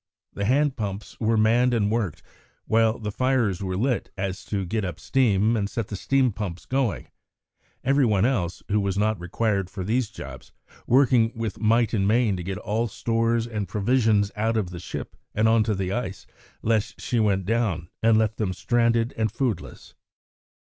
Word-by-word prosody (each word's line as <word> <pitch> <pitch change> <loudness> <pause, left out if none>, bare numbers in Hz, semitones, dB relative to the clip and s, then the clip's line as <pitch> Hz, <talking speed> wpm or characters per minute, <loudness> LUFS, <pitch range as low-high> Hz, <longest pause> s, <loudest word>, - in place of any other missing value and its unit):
The 100 - -2
hand 140 +4 +2
pumps 100 -3 -5
were 115 0 +2
manned 120 +3 +3
and 105 -2 +1
worked, 110 -9 -2 0.4
while 115 0 +3
the 105 -2 -4
fires 120 -6 +1
were 95 -1 -2
lit 125 +4 0
so - - -31
as 95 0 -3
to 100 -2 -2
get 110 +4 -2
up 90 -4 -4
steam 115 -4 +2
and 100 -2 -1
set 115 - -4
the 105 - -4
steam 130 +5 +2
pumps 100 -4 -5
going, 130 -5 -1 0.7
every 135 +1 +3
one 105 -1 +3
else, 100 -9 -1
who 105 +1 +2
was 100 -1 -1
not 105 -1 +1
required 100 +2 -1
for 95 0 -5
these 115 +3 0
jobs, - - -10 0.4
working 125 -3 +4
with 115 -2 -4
might 115 +1 +3
and 100 -3 +1
main 110 -2 +3
to 90 - -5
get 95 +1 -4
all 110 +3 -1
stores 115 +1 0
and 105 -4 -4
provisions 105 0 +2
out 110 +2 0
of 95 -5 -1
the 90 - -7
ship - - -7 0.2
and 110 +1 +3
on 115 0 +4
to 110 -2 0
the 95 -1 -2
ice, 100 -4 -4 0.4
lest 110 -2 0
she 120 - -1
went 100 -4 +1
down 110 -6 0
and 115 -1 +4
left 110 -1 +1
them 100 -4 -1
stranded 115 +3 +1
and 110 -2 0
foodless. 120 -4 -4
110 Hz, 185 wpm, -25 LUFS, 100-115 Hz, 0.7 s, working